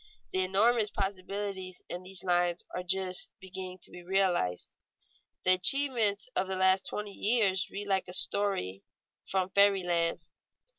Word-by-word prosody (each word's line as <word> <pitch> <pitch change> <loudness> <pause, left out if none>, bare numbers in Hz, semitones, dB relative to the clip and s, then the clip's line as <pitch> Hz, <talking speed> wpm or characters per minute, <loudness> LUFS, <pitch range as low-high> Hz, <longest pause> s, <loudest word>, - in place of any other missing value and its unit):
The 185 - 0
enormous 210 +4 +3
possibilities 195 -1 -4
in 175 - -5
these 185 -1 -3
lines 175 -1 +1
are 180 - -2
just 185 0 -1
beginning 185 -1 -7
to - - -9
be 180 - -10
realized. 175 - 0 0.8
The 185 - +7
achievements 220 +1 +3
of 185 - 0
the 190 - -2
last 190 0 +3
twenty 210 -1 -5
years 200 -5 +1
read 205 +1 -6
like 195 -2 0
a 180 - -7
story 185 - 0 0.5
from 190 -1 0
fairy 200 -1 +4
land. 170 -1 0
190 Hz, 145 wpm, -30 LUFS, 180-200 Hz, 0.8 s, The